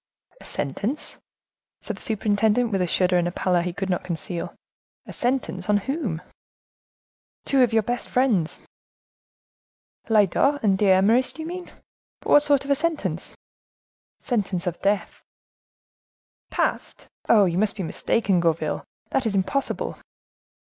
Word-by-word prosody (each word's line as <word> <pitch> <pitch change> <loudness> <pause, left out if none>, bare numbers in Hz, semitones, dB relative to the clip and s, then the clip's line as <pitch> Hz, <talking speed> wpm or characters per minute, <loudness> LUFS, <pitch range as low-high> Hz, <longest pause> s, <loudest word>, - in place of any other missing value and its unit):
"A - - -14
sentence?" 210 - -4 0.6
said - - -5
the - - -14
superintendent, 220 +2 +2
with 195 -2 +1
a 180 - +1
shudder 180 +1 +2
and 175 0 -2
pallor 180 -2 +2
he 180 +1 -2
could 190 +2 -4
not 180 - -1
conceal. 170 0 -4 0.5
"A - - -9
sentence!—and 205 -5 0
on - - -15
whom?" 265 - -2 1.2
"Two 275 -1 +3
of 245 - +4
your 225 -1 +3
best 245 +3 -3
friends." 225 -11 +1 1.5
"Lyodot 225 +7 +3
and 200 -3 +4
D'Eymeris, 200 +6 +4
do 320 - -7
you - - -6
mean? 360 +1 -7 0.5
But - - -7
what 290 - +8
sort 285 -2 +2
of 280 - -2
a - - +5
sentence?" 285 - -2 0.8
"Sentence 200 -7 -1
of 175 -1 -3
death." 200 +1 -1 1.3
"Passed? - - -2 0.2
Oh! 210 -3 +6
you 175 0 0
must 210 -1 +1
be 195 - -4
mistaken, 190 +3 0
Gourville; 165 -1 0 0.3
that 260 - +1
is 205 - -1
impossible." 195 +9 -1
205 Hz, 140 wpm, -24 LUFS, 180-250 Hz, 1.5 s, what